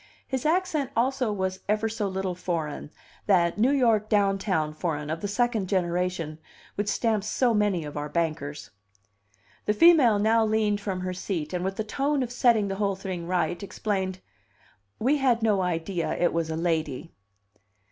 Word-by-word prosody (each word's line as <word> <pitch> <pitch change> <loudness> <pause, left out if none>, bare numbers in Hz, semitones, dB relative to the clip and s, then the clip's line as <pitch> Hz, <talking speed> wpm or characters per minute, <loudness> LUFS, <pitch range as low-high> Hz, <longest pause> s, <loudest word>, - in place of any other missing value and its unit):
His 265 +2 -1
accent 320 -5 +1
also 255 -1 +1
was 190 -2 -2
ever 215 +1 +2
so 220 -2 -2
little 190 -1 -2
foreign 165 -5 -4 0.4
that 175 -2 +3
New 240 +4 +4
York 230 -6 +2
downtown 195 -6 +1
foreign, 155 -2 -3
of 165 - -3
the 205 - -2
second 220 -2 0
generation, 175 -4 -1 0.3
which 205 0 -2
stamps 215 -1 0
so, 245 +1 +2
many 205 -5 +1
of 145 - -8
our 150 0 -4
bankers. 150 -3 -3 1.0
The 210 - +3
female 290 -7 +6
now 220 +2 +3
leaned 215 -1 +1
from 190 -3 -3
her 185 0 -3
seat, 180 -3 -4
and 180 0 -1
with 190 +1 -2
the 220 - -2
tone 275 +5 0
of 240 - -5
setting 235 -4 +3
the 195 0 -3
whole 200 -1 0
thing 185 -3 -5
right, 175 -1 0
explained: 190 -2 -3 0.8
"We 270 +6 +2
had 250 -5 +2
no 210 -4 +3
idea 175 0 -2
it 175 - +2
was 165 -1 -1
a 160 - -2
lady." 160 -2 -2
195 Hz, 165 wpm, -26 LUFS, 175-220 Hz, 1.0 s, female